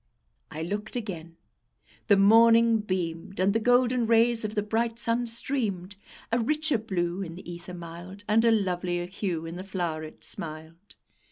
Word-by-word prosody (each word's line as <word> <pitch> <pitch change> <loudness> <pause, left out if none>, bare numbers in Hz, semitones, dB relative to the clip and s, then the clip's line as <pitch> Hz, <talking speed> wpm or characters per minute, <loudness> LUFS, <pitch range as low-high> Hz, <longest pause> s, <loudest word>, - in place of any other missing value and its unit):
I 155 +2 -5
looked 205 +6 -4
again; 170 -8 -6 0.7
the 205 -3 +5
morning 230 +2 +6
beamed, 185 -2 -4
And 190 +2 +3
the 225 - +2
golden 245 0 +3
rays 230 0 +3
of 215 +1 -4
the 210 - 0
bright 225 +2 -1
sun 235 +1 +1
streamed: 220 -6 -1 0.4
A 235 - +2
richer 300 +2 +1
blue 180 -4 -2
in 165 -3 -6
the 180 - -11
ether 175 +1 -8
mild, 175 +3 -9
And 220 +1 +3
a 235 - +5
lovelier 180 -5 0
hue 180 -3 -4
in 165 +1 -6
the 185 - -6
flow'ret 165 -5 -5
smiled. 165 +4 -5
200 Hz, 160 wpm, -27 LUFS, 175-230 Hz, 0.7 s, morning